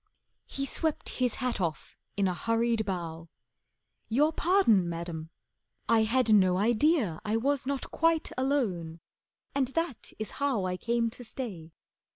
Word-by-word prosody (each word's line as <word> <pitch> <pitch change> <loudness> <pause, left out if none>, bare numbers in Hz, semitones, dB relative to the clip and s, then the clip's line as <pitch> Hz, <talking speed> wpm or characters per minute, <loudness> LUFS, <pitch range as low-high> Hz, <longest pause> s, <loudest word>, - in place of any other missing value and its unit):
He 275 - -3
swept 315 +3 -2
his 250 -2 0
hat 250 -5 -2
off 160 -5 -3 0.2
in 200 -1 +3
a 180 - 0
hurried 230 +2 0
bow. 165 -3 -4 0.8
"Your 295 +8 +3
pardon, 270 - +3
Madam, 165 -1 -5 0.6
I 225 -1 +4
had 230 0 +3
no 185 -3 +5
idea 230 - +2
I 215 +1 0
was 270 +2 0
not 280 -1 -3
quite 330 -1 +1
alone, 210 - -1 0.5
and 275 -2 +1
that 330 -1 -3
is 215 - -5
how 260 -9 +1
I 180 0 -1
came 230 +3 0
to 245 - -10
stay. 195 -10 -6
230 Hz, 145 wpm, -29 LUFS, 180-270 Hz, 0.8 s, no